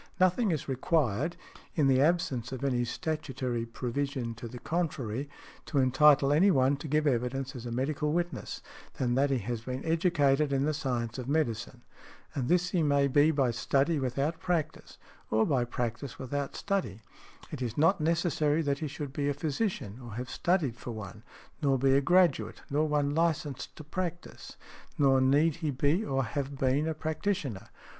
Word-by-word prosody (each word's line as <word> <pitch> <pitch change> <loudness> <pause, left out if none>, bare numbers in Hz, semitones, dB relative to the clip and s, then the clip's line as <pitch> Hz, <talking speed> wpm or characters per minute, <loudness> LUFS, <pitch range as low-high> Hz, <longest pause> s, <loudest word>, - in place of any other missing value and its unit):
Nothing 185 +5 +3
is 155 -6 -2
required 140 - 0 0.4
(in 150 - +3
the 135 -1 +4
absence 140 -7 +1
of 130 +1 -5
any 125 -3 +1
statutory 130 -4 -3
provision 125 0 -3
to 115 +1 -8
the 125 - -9
contrary) 140 -4 -2 0.4
to 145 - -2
entitle 140 +2 +5
any 180 +7 +5
one 135 -5 +3
to 145 - -7
give 150 +1 +1
evidence 130 0 -1
as 120 -1 -6
a - - -5
medical 140 +4 -1
witness, 175 -3 -3 0.3
than 125 -2 0
that 140 +3 +2
he 135 - +2
has 120 +1 -4
been 130 +3 -5
educated 155 -4 +2
in 135 0 +1
the 155 - +1
science 125 -6 -2
of 130 +1 -5
medicine; 120 -5 -1 0.5
and 135 -5 -2
this 180 +1 +2
he 180 - +2
may 140 -2 +3
be 145 +3 +4
by 140 -5 +2
study 140 +6 +1
without 135 +5 -1
practice, 165 -3 -2 0.3
or 110 0 +3
by 135 -5 +2
practice 120 +2 -4
without 140 +2 -4
study; 185 - -2 0.5
it - - -6
is 120 -2 -3
not 165 +4 +3
necessary 160 -1 +1
that 140 -1 0
he 155 - -2
should 145 -1 -6
be 145 0 -1
a 145 - -1
physician, 145 - -2
or 120 -3 -8
have 125 +1 -5
studied 170 -9 +1
for 120 - -8
one, 110 -2 -7 0.4
nor 140 -3 +3
be 135 +1 +3
a 140 - +4
graduate, 175 0 +2
nor 150 +2 +2
one 145 -1 +1
licensed 160 -4 -1
to - - -9
practise, 175 +2 -6 0.4
nor 135 -2 +4
need 145 +4 +3
he 160 -3 -2
be 145 - +1
or 135 -7 0
have 140 +3 -4
been 135 +4 +1
a 160 - -1
practitioner. 155 - -2
140 Hz, 175 wpm, -30 LUFS, 125-155 Hz, 0.5 s, entitle